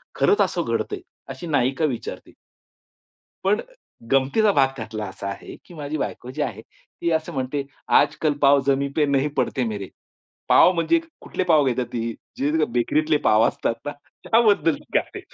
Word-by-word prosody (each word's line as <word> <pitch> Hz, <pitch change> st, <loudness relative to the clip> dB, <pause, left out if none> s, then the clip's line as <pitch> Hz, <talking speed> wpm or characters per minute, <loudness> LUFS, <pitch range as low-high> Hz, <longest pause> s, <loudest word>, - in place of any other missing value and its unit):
खरंच 415 Hz, -, +3 dB
असं -, -, +1 dB
घडतंय?" 410 Hz, -2 st, -2 dB, 0.3 s
अशी 175 Hz, -, -8 dB
नायिका 135 Hz, 0 st, +1 dB
विचारते. -, -, -9 dB, 1.1 s
पण 205 Hz, +2 st, +3 dB
अ, -, -, -5 dB, 0.5 s
गमंतीचा 135 Hz, +11 st, +3 dB
भाग 140 Hz, -6 st, +4 dB
त्यातला 110 Hz, -2 st, -5 dB
असा 95 Hz, +1 st, -7 dB
आहे 100 Hz, -, -8 dB
की -, -, -14 dB
माझी 150 Hz, -1 st, -4 dB
बायको 125 Hz, -3 st, -4 dB
जी 150 Hz, -, -4 dB
आहे 110 Hz, -7 st, -3 dB
ती 170 Hz, +7 st, -6 dB
असं 160 Hz, 0 st, -1 dB
म्हणते, 135 Hz, +2 st, -2 dB, 0.3 s
"आजकल 155 Hz, -2 st, +2 dB
पाव 140 Hz, 0 st, +6 dB
जमी 140 Hz, 0 st, +2 dB
पे 150 Hz, -2 st, +3 dB
नहीं 140 Hz, +1 st, +1 dB
पडते 130 Hz, -, 0 dB
मेरे." 100 Hz, -3 st, -5 dB, 0.6 s
पाव -, -, +7 dB
म्हणजे 185 Hz, -, +2 dB, 0.2 s
कुठले 185 Hz, -, -3 dB
पाव 155 Hz, -5 st, +4 dB
घेतात 125 Hz, -1 st, 0 dB
ती 115 Hz, -1 st, -2 dB, 0.3 s
जे 145 Hz, +2 st, 0 dB
ती, 155 Hz, -, +3 dB
बेकरीतले 150 Hz, +6 st, +2 dB
पाव 110 Hz, +1 st, +5 dB
असतात 115 Hz, -, -1 dB
ना 145 Hz, -, -2 dB, 0.3 s
त्याबद्दल 215 Hz, -8 st, +3 dB, 0.2 s
गाते. -, -, 0 dB
140 Hz, 165 wpm, -23 LUFS, 125-160 Hz, 1.1 s, पाव